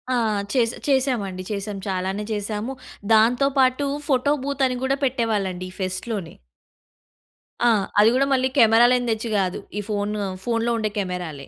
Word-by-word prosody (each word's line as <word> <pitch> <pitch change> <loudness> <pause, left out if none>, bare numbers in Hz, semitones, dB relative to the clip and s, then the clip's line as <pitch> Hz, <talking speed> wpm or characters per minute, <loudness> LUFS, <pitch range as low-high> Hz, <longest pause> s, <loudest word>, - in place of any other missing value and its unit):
ఆ! - - +2 0.4
చేస 240 -3 +3 0.2
చేసామండి 245 -9 0
చేసాం 205 0 -4
చాలానే 190 +2 -2
చేసాము. 210 +4 -3 0.4
దాంతో 240 +5 +4
పాటు 260 +2 +3 0.2
ఫోటో 280 0 +2
బూత్ 280 -1 -1
అని 255 - -2
కూడా 270 +1 +1
పెట్టేవాళ్ళండి 210 -8 -1
ఈ - - -17
ఫెస్ట్‌లోనే. 185 -1 -4 1.3
ఆ! - - +6 0.3
అది 215 +2 +7
కూడా 275 - +3
మళ్ళీ 260 0 +2
కెమెరాలని 240 +1 +5
తెచ్చి 220 +1 -2
కాదు, 185 -2 -1 0.2
ఈ 210 - -1
ఫోన్ 205 0 -1 0.3
ఫోన్‌లో 230 0 0
ఉండే 215 -1 -1
కెమెరాలే 180 -7 -5
220 Hz, 140 wpm, -23 LUFS, 195-255 Hz, 1.3 s, అది